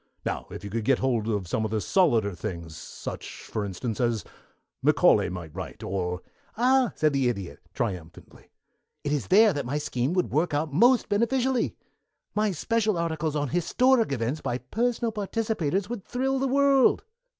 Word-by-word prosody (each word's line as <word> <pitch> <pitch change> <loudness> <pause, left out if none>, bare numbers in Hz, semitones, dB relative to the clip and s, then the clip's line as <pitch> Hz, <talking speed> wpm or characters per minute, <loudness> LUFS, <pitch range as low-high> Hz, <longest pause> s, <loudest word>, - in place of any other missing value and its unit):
Now, - - -3
if - - -8
you 100 - -6
could 115 +1 -2
get 135 +5 +3
hold 120 -5 0
of 105 -5 -1
some 110 - -1
of 110 - -1
the 110 0 0
solider 115 - +2
things, 85 -3 -6
such, 80 - -8
for 105 - -3
instance, 105 +4 -4
as 115 -5 0 0.6
Macaulay - - +4
might 85 -4 -7
write, - - -7
or" 90 -1 -3 0.3
"Ah!" 255 0 +3
said 155 -2 +2
the 135 -3 +2
Idiot, 100 -7 -5 0.2
triumphantly, 90 -8 -5 0.5
"it 145 - -2
is 145 -3 -1
there 210 +2 +6
that 145 -2 -2
my 135 +4 -2
scheme 130 0 -1
would 180 -1 0
work 155 +1 +1
out 150 0 -1
most 240 - +4
beneficently. 245 +4 +1 0.6
My 210 0 +1
special 215 +3 0
articles 160 -2 -1
on 145 -2 -1
historic 230 - +2
events 130 +4 -1
by 120 - -2
personal 230 - -1
participators 205 -4 -1
would 230 -4 -5
thrill 265 +4 -1
the 270 - +1
world. 275 0 +4
150 Hz, 170 wpm, -26 LUFS, -, 0.6 s, there